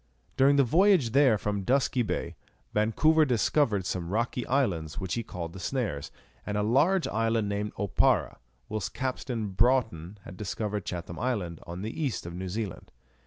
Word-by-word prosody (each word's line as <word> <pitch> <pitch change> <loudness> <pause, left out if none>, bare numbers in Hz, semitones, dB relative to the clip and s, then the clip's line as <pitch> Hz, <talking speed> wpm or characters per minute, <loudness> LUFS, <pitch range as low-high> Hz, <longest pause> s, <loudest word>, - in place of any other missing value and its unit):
During 135 +2 +5
the 140 - +5
voyage 170 - +4
there 130 -4 +5
from 105 0 -2
Dusky 130 +4 +1
Bay, 100 -6 -3 0.4
Vancouver 155 +10 +3
discovered 120 -5 +2
some 90 -2 -3
rocky 115 +4 -1
islands, 95 - 0
which 95 -3 -3
he 120 - -1
called 85 -6 -6
the 95 - -9
Snares, 90 - -2 0.3
and 105 - -3
a 105 - +1
large 150 - +3
island 115 0 0
named 100 +1 -3
Oparra, 100 -1 +1 0.3
whilst 105 -3 -4
Captain 125 -4 -3
Broughton 105 -4 +1
had 90 - -10
discovered 105 0 -3
Chatham 85 -1 -5
Island, 100 -10 -2
on 85 +3 -6
the 110 - -3
east 135 - -2
of 85 - -6
New 90 +1 -5
Zealand. 100 -1 -5
110 Hz, 165 wpm, -28 LUFS, 95-130 Hz, 0.4 s, During